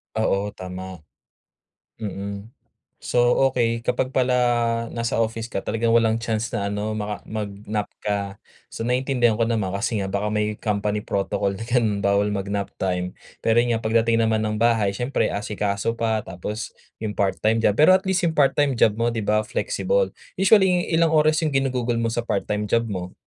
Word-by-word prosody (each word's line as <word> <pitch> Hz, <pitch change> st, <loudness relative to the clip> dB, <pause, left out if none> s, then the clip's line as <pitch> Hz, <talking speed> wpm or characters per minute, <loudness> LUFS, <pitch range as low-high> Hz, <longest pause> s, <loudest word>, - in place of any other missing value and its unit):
Oo, 105 Hz, -2 st, 0 dB
tama. 95 Hz, -1 st, -8 dB, 1.0 s
Mm. 100 Hz, +1 st, -6 dB, 0.5 s
So, -, -, -3 dB, 0.3 s
okey 115 Hz, -2 st, 0 dB
kapag 130 Hz, +1 st, 0 dB
pala 130 Hz, -1 st, +3 dB, 0.6 s
nasa 115 Hz, -1 st, -2 dB
office 115 Hz, +1 st, -2 dB
ka -, -, -1 dB
talagang 115 Hz, +1 st, -1 dB
walang 115 Hz, -1 st, +3 dB
chance 115 Hz, -1 st, -2 dB
na 100 Hz, 0 st, -1 dB
ano 105 Hz, +1 st, -2 dB
maka 105 Hz, 0 st, -4 dB
mag-nap 105 Hz, 0 st, -4 dB, 0.2 s
ka. 100 Hz, -1 st, -2 dB, 0.4 s
So, -, -, -8 dB
naintindihan 125 Hz, -2 st, +1 dB
ko -, -, +4 dB
naman 110 Hz, -5 st, -1 dB
kasi 110 Hz, +1 st, -1 dB
nga 95 Hz, -, -2 dB
baka 100 Hz, +2 st, -1 dB
may 105 Hz, 0 st, 0 dB
company 105 Hz, 0 st, -1 dB
protocol 100 Hz, 0 st, -1 dB
na 115 Hz, -, -6 dB
ganun 115 Hz, -5 st, +1 dB
bawal 100 Hz, +1 st, +3 dB
mag-nap 100 Hz, 0 st, -2 dB
time. 90 Hz, -1 st, -1 dB, 0.3 s
Pero 115 Hz, 0 st, +3 dB
'yon 120 Hz, 0 st, +1 dB
nga -, -, -4 dB
pagdating 115 Hz, +1 st, +2 dB
naman 110 Hz, -1 st, +1 dB
ng 105 Hz, 0 st, -1 dB
bahay 115 Hz, -4 st, +3 dB
siyempre 125 Hz, +3 st, 0 dB
asikaso 105 Hz, +2 st, -2 dB
pa 110 Hz, -1 st, +1 dB
tapos 95 Hz, +4 st, -6 dB, 0.3 s
yung 110 Hz, -2 st, -3 dB
part-time 105 Hz, +3 st, +1 dB
job 110 Hz, -, +3 dB
pero 155 Hz, +5 st, +7 dB
at 190 Hz, -, -5 dB
least 190 Hz, 0 st, +2 dB
yung 165 Hz, -, +2 dB
part-time 145 Hz, 0 st, +3 dB
job 110 Hz, -, +4 dB
mo, 115 Hz, -, +2 dB
'di 115 Hz, -, -2 dB
ba, 105 Hz, +1 st, +2 dB
flexible. -, -, 0 dB, 0.3 s
Usually 190 Hz, -3 st, +4 dB
ilang 165 Hz, 0 st, +4 dB
oras 155 Hz, +1 st, +4 dB
yung 155 Hz, -, 0 dB
ginugugol 125 Hz, -3 st, 0 dB
mo 115 Hz, -, 0 dB
sa 120 Hz, -, 0 dB
part 100 Hz, -, -1 dB
time 105 Hz, 0 st, -1 dB
job 115 Hz, +2 st, +2 dB
mo? 90 Hz, -3 st, -5 dB
110 Hz, 175 wpm, -23 LUFS, 100-120 Hz, 1.0 s, pero